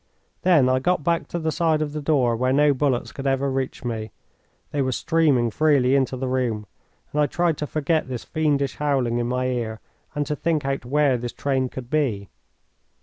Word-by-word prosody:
Then 165 Hz, -8 st, +4 dB
I 130 Hz, 0 st, +3 dB
got 175 Hz, +3 st, 0 dB
back 170 Hz, +2 st, 0 dB
to -, -, -4 dB
the 160 Hz, -1 st, -1 dB
side 160 Hz, 0 st, +1 dB
of 150 Hz, -1 st, -2 dB
the 150 Hz, -, -3 dB
door 135 Hz, -6 st, +2 dB
where 130 Hz, +2 st, +1 dB
no 145 Hz, +1 st, +4 dB
bullets 130 Hz, -2 st, 0 dB
could 135 Hz, 0 st, -5 dB
ever 135 Hz, 0 st, +1 dB
reach 130 Hz, -1 st, -3 dB
me 110 Hz, -2 st, -4 dB, 0.6 s
they 145 Hz, -, 0 dB
were 130 Hz, -1 st, 0 dB
streaming 135 Hz, -4 st, +2 dB
freely 140 Hz, -1 st, +3 dB
into 130 Hz, -1 st, +1 dB
the 130 Hz, +1 st, -3 dB
room 125 Hz, -5 st, -1 dB, 0.5 s
and 150 Hz, -, +1 dB
I 145 Hz, -, +3 dB
tried 170 Hz, +2 st, +1 dB
to 150 Hz, -, -3 dB
forget 155 Hz, +1 st, 0 dB
this 125 Hz, -3 st, -5 dB
fiendish 145 Hz, -4 st, 0 dB
howling 130 Hz, -5 st, 0 dB
in 120 Hz, -, -1 dB
my 125 Hz, +1 st, -1 dB
ear 115 Hz, -3 st, -2 dB, 0.4 s
and 145 Hz, 0 st, 0 dB
to 150 Hz, -, -2 dB
think 155 Hz, -2 st, -1 dB
out 135 Hz, -2 st, -2 dB
where 140 Hz, 0 st, +2 dB
this 120 Hz, 0 st, -5 dB
train 130 Hz, -2 st, -1 dB
could 125 Hz, -1 st, -8 dB
be. 115 Hz, -, 0 dB
135 Hz, 205 wpm, -23 LUFS, 125-150 Hz, 0.6 s, Then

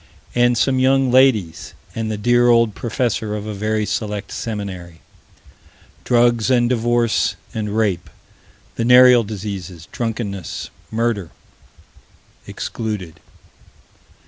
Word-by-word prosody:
And 120 Hz, 0 st, +3 dB
some 130 Hz, +2 st, +2 dB
young 135 Hz, 0 st, +3 dB
ladies 120 Hz, -10 st, +2 dB, 0.2 s
and 115 Hz, -1 st, -3 dB
the 110 Hz, -, -3 dB
dear 120 Hz, +3 st, +3 dB
old 115 Hz, -2 st, +4 dB
professor 115 Hz, -2 st, -2 dB
of 105 Hz, 0 st, -5 dB
a 110 Hz, -, -5 dB
very 110 Hz, +1 st, -1 dB
"select" 105 Hz, -1 st, -4 dB
seminary. 95 Hz, -7 st, -6 dB, 1.1 s
Drugs 120 Hz, -1 st, +3 dB
and 120 Hz, -2 st, +3 dB
divorce 120 Hz, -1 st, +1 dB, 0.2 s
and 105 Hz, -1 st, -3 dB
rape: 100 Hz, -6 st, 0 dB, 0.7 s
venereal 125 Hz, 0 st, +6 dB
diseases, 95 Hz, -5 st, -7 dB
drunkenness, 105 Hz, -6 st, -4 dB, 0.2 s
murder 110 Hz, -6 st, -1 dB, 1.2 s
Excluded. 95 Hz, -8 st, -5 dB
110 Hz, 100 wpm, -19 LUFS, 100-120 Hz, 1.2 s, venereal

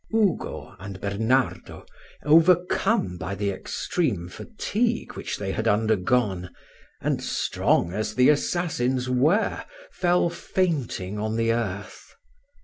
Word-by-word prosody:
Ugo 215 Hz, -5 st, 0 dB
and 100 Hz, 0 st, -8 dB
Bernardo, 110 Hz, +7 st, -1 dB, 0.4 s
overcome 170 Hz, -, +3 dB
by 100 Hz, -, -4 dB
the 100 Hz, 0 st, -1 dB
extreme 95 Hz, -, -2 dB
fatigue 225 Hz, -, -2 dB
which -, -, -4 dB
they 95 Hz, -1 st, -3 dB
had 110 Hz, +3 st, -2 dB
undergone, 105 Hz, -2 st, +1 dB, 0.5 s
and -, -, 0 dB
strong 85 Hz, -, 0 dB
as 110 Hz, +2 st, -2 dB
the 125 Hz, 0 st, +5 dB
assassins 135 Hz, -5 st, 0 dB
were, 150 Hz, -, +2 dB, 0.3 s
fell 175 Hz, -1 st, +2 dB
fainting 140 Hz, -, -2 dB
on 110 Hz, +1 st, -2 dB
the 115 Hz, 0 st, +2 dB
earth. 105 Hz, -4 st, -5 dB
120 Hz, 110 wpm, -25 LUFS, -, 0.5 s, the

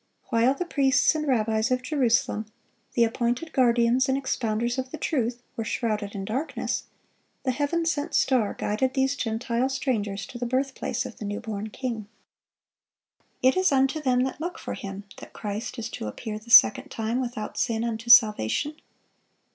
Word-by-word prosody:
While 235 Hz, +3 st, +3 dB
the 360 Hz, -, -3 dB
priests 275 Hz, -4 st, +3 dB
and 305 Hz, -1 st, -3 dB
rabbis 220 Hz, -3 st, +1 dB
of 255 Hz, 0 st, 0 dB
Jerusalem, 245 Hz, -6 st, +1 dB, 0.5 s
the 235 Hz, -, +4 dB
appointed 240 Hz, +7 st, -1 dB
guardians 245 Hz, +1 st, +3 dB
and 265 Hz, -, +2 dB
expounders 240 Hz, -2 st, -1 dB
of 260 Hz, 0 st, -3 dB
the 315 Hz, -, -6 dB
truth, 245 Hz, -5 st, -1 dB
were 225 Hz, -, -3 dB
shrouded 215 Hz, -3 st, -2 dB
in 195 Hz, -1 st, -4 dB
darkness, 260 Hz, +10 st, -2 dB, 0.6 s
the 260 Hz, -, +1 dB
Heaven 295 Hz, +6 st, -1 dB
sent 320 Hz, -1 st, -1 dB
star 245 Hz, -6 st, +2 dB
guided 255 Hz, +6 st, -1 dB
these 265 Hz, +1 st, +2 dB
Gentile 235 Hz, +1 st, -1 dB
strangers 215 Hz, -7 st, -2 dB
to 240 Hz, -, -9 dB
the 245 Hz, -, -2 dB
birthplace 260 Hz, 0 st, -1 dB
of 250 Hz, -, -8 dB
the 210 Hz, -, -5 dB
new 205 Hz, +1 st, -3 dB
born 220 Hz, -2 st, -5 dB
King. 230 Hz, -3 st, -4 dB, 1.4 s
It 260 Hz, +1 st, +5 dB
is 370 Hz, -2 st, +3 dB
"unto 270 Hz, +3 st, +2 dB
them 255 Hz, -3 st, +2 dB
that 265 Hz, +3 st, -4 dB
look 345 Hz, +2 st, -4 dB
for -, -, -5 dB
Him" 195 Hz, 0 st, -7 dB
that -, -, -12 dB
Christ 210 Hz, +4 st, -5 dB
is 230 Hz, -1 st, -3 dB
to -, -, -5 dB
"appear 215 Hz, -, -5 dB
the 225 Hz, +2 st, -17 dB
second 260 Hz, +3 st, +7 dB
time 225 Hz, +3 st, -2 dB
without 240 Hz, -4 st, -5 dB
sin 225 Hz, -1 st, 0 dB
unto 230 Hz, 0 st, -4 dB
salvation." 235 Hz, -, +5 dB
245 Hz, 170 wpm, -26 LUFS, 220-265 Hz, 1.4 s, second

